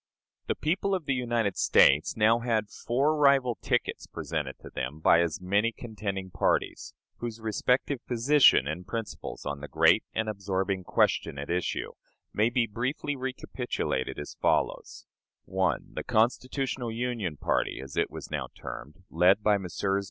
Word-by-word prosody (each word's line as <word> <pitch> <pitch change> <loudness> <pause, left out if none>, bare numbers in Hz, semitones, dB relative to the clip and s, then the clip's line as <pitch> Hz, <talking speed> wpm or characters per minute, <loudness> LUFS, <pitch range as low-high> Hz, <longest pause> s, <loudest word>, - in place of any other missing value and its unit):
The - - 0
people 185 +5 0
of 180 -5 -4
the 140 - +1
United 120 -5 0
States 75 +9 +4
now 110 +2 +4
had 110 -3 -1
four 140 +6 0
rival 140 -5 +3
tickets - - -1
presented 75 -5 -4
to - - -11
them 65 +4 -4
by 85 +1 +5
as 85 -3 -1
many 100 +5 +1
contending 100 -5 -5
parties, - - -1 0.2
whose 115 -1 -5
respective 125 +4 0
position 125 - +5
and 85 +5 -5
principles 110 - -6
on 70 0 -3
the 75 - -6
great - - +4
and 110 0 0
absorbing 95 -2 -2
question 70 - +1
at 70 +3 -5
issue 90 0 -2 0.4
may 110 +2 +3
be 120 -1 +2
briefly 130 +6 -3
recapitulated 130 - -3
as 75 - -7
follows: - - 0 0.4
1. 95 -1 -1
The - - -4
"Constitutional 120 +2 0
Union" 115 -9 -3
Party, - - 0
as 70 0 -9
it - - +1
was - - -9
now - - -2
termed, 75 +8 -9
led 90 +5 +4
by 105 -1 +3
Messrs. 95 +2 -1
110 Hz, 150 wpm, -28 LUFS, 90-125 Hz, 0.4 s, by